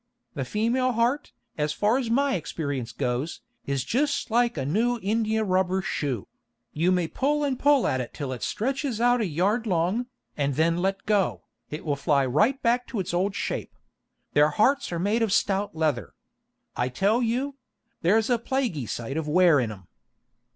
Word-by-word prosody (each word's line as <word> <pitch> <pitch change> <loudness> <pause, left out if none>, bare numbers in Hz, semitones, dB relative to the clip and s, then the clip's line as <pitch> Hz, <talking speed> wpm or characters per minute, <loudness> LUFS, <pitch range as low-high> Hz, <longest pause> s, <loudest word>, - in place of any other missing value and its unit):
The 135 -5 -3
female 240 - +1
heart, 240 +6 0 0.3
as 150 0 0
far 215 +5 +2
as 245 -4 -3
my 275 +4 +2
experience 145 -7 -3
goes, 125 +7 -2 0.3
is 140 -2 0
jist 280 - 0
like 235 -4 +2
a 135 - -2
new 230 - +1
india 220 +1 +1
rubber 185 -1 +1
shoe: 130 - -2 0.5
you 170 +4 +2
may 180 -2 +1
pull 295 - 0
and 270 -3 -1
pull 285 -2 +4
at 130 - +1
it 125 - -6
till 140 -4 -4
it 125 - -7
stretches 265 0 -2
out 245 0 +3
a 215 - 0
yard 200 +9 0
long, 185 +7 0 0.3
and 140 -2 -1
then 165 +3 +2
let 195 +1 -1
go, 205 -3 +1 0.3
and 150 - -4
it - - -14
will 145 -2 0
fly 140 -1 +2
right 210 - +2
back 245 +1 +2
to 230 - -4
its 180 -2 -3
old 190 +3 0
shape. - - -4 0.6
Their 150 +1 +5
hearts 240 - +2
are 170 - -2
made 205 +7 +1
of 225 -3 +1
stout 200 -3 +1
leather, 155 -6 -1 0.6
I 125 +1 0
tell 200 - +1
you; 255 +4 -1 0.4
there's 220 +7 +3
a 240 - +3
plaguy 230 - -2
sight 120 +7 -4
of 160 -1 -2
wear 170 -1 +5
in 115 -4 -1
'em. 95 -4 -12
195 Hz, 185 wpm, -26 LUFS, 150-240 Hz, 0.6 s, Their